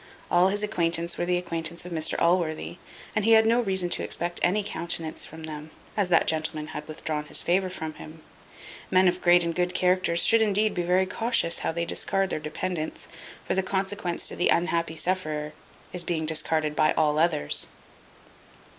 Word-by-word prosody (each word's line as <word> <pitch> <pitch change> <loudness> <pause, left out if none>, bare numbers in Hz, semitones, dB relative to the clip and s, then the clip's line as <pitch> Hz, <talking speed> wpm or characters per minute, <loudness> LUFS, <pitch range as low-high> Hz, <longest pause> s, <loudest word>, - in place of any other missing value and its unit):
All 175 +1 +5
his 205 +2 +1
acquaintance 170 -4 0
were 175 - -3
the 180 0 +2
acquaintance 170 -1 -4
of 180 - -8
Mr 160 -2 +1
Allworthy; 170 0 0 0.4
and 215 - +1
he 225 +2 +5
had 220 0 +6
no 230 +2 +3
reason 190 -5 +1
to - - 0
expect 175 0 -2
any 200 +4 +2
countenance 165 -4 -2
from 160 +1 -11
them, 155 0 -7 0.3
as 200 -4 0
that 170 - +4
gentleman 155 -1 -1
had 150 - -7
withdrawn 155 -1 -4
his - - -1
favour 185 +2 +1
from 160 -4 -6
him. 155 +1 -12 0.7
Men 185 0 +4
of 180 +1 0
great 175 0 +5
and 170 0 -2
good 180 +1 -1
characters 180 -2 +2
should 230 0 +4
indeed 215 0 +2
be 175 - -1
very 180 +2 +2
cautious 225 -4 +1
how - - -1
they 170 +1 -2
discard 195 +2 0
their - - -2
dependents; 155 +2 -5 0.4
for - - 0
the 190 - +2
consequence 190 -1 -2
to - - -1
the 175 - +1
unhappy 170 -2 +1
sufferer 155 -3 -2 0.4
is 180 -1 +1
being 165 -2 -2
discarded 155 -1 0
by 155 0 +3
all 150 -1 +1
others. 160 - +2
175 Hz, 185 wpm, -26 LUFS, 160-185 Hz, 0.7 s, had